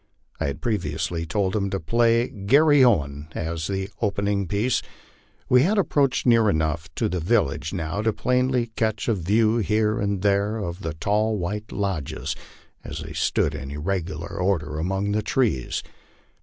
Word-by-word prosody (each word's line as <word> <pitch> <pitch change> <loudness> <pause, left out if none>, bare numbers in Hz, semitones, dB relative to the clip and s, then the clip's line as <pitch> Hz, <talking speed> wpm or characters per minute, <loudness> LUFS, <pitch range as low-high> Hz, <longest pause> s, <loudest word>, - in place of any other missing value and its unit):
I - - 0
had 70 0 -4
previously 85 -5 -2
told 95 +2 0
him 100 -2 0
to 95 - -2
play 115 +6 +2
"Garry 140 +8 +4
Owen" 75 - +2
as 80 -1 -3
the 95 -1 -2
opening 100 -2 0
piece. 105 +7 +1 0.7
We 125 0 +5
had 200 +9 +2
approached 145 -8 +2
near 115 -3 +5
enough 80 -1 -1
to - - 0
the 90 +1 -2
village 80 -5 +1
now 85 +1 -2
to 110 +1 +2
plainly 125 0 0
catch 110 -2 -1
a 115 - +3
view 110 +5 +2
here 110 0 +1
and 100 -2 -1
there 100 +2 +2
of 90 -4 -4
the 80 -5 -4
tall 105 +6 +1
white 105 +4 -4
lodges 95 -9 -3 0.5
as 75 +2 -6
they 80 0 -8
stood 75 - +1
in 70 - -6
irregular 80 +2 -3
order 80 -5 0
among 95 +4 -1
the 105 +1 +1
trees. 105 - 0
100 Hz, 160 wpm, -24 LUFS, 80-110 Hz, 0.7 s, We